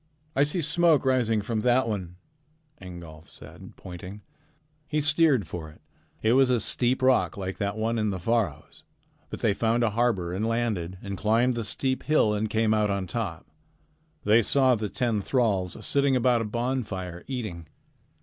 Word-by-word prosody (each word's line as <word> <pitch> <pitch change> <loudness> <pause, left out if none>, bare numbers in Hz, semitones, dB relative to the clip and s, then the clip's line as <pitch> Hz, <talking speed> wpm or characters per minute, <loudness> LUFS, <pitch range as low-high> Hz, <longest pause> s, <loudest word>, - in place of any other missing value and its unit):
"I 135 - +3
see 150 +5 +1
smoke 165 -1 +3
rising 120 -5 +2
from 110 +1 -2
that 125 +2 +3
one," 95 -5 -4 0.7
Ingolf 85 -3 -11
said, - - -12
pointing. 95 +3 -9 0.6
He 150 0 0
steered 150 - +3
for 80 0 -7
it. 75 - -17 0.4
It 110 +2 +4
was 135 0 +4
a 125 -2 +3
steep 125 +4 0
rock 130 -4 +3
like 95 -1 -5
that 100 0 -2
one 115 +1 -1
in 105 -1 0
the 95 - -2
Faroes, 100 -4 -2 0.5
but - - -7
they - - +2
found 115 +3 +1
a 115 - +2
harbor 105 -6 0
and 105 +4 -1
landed 110 -7 -2
and 100 -2 -5
climbed 115 +4 +2
the 120 -1 -3
steep 130 +5 -1
hill 150 -8 +2
and 105 +1 -1
came 110 0 +2
out 105 -1 +2
on 100 -1 -1
top. 90 -3 -4 0.8
They 110 +3 +5
saw 130 +3 +3
the 105 -3 -2
ten 115 -3 -1
thralls 100 -6 0
sitting 140 -1 +2
about 125 -1 +3
a - - -2
bonfire 105 -7 -3
eating. 110 - -5
110 Hz, 170 wpm, -26 LUFS, 100-125 Hz, 0.8 s, They